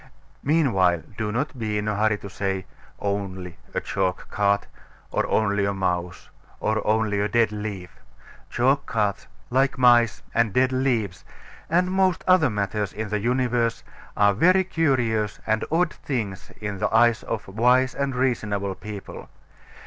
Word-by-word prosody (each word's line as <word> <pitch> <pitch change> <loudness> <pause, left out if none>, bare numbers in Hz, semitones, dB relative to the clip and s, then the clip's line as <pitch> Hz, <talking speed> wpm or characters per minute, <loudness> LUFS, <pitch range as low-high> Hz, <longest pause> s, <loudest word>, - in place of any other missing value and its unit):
Meanwhile, 95 - +2
do 105 -1 -2
not 130 +3 -3
be 105 -2 -1
in 105 +1 -2
a 105 - 0
hurry 105 0 +2
to 100 - -9
say, 95 -1 -2 0.3
"Only 95 -3 -4 0.2
a - - +2
chalk 95 -2 -2
cart," 100 0 +1 0.5
or - - 0
only 100 -2 +1
a 100 0 0
mouse, 90 -2 -3 0.3
or 110 0 0
only 110 -1 +1
a 100 - +1
dead 115 0 +2
leaf. 105 -4 -6 0.5
Chalk 135 +4 +1
carts, 105 -4 -1 0.2
like 135 +2 +2
mice, 120 -3 +4
and 115 -3 +2
dead 130 +1 +3
leaves, 120 -9 -1 0.5
and 180 +2 +2
most 190 -2 +2
other 180 -6 +5
matters 105 -2 -2
in 110 +1 -4
the 105 0 -1
universe 120 0 0 0.3
are 100 0 +5
very 185 - +4
curious 120 - 0
and 110 0 +1
odd 165 0 +2
things 105 -9 -4
in 100 -2 -4
the 105 - 0
eyes 115 0 +4
of 115 - -4
wise 125 +6 +3
and 140 -2 -2
reasonable 105 -6 0
people. 105 0 -9
110 Hz, 150 wpm, -24 LUFS, 100-125 Hz, 0.5 s, other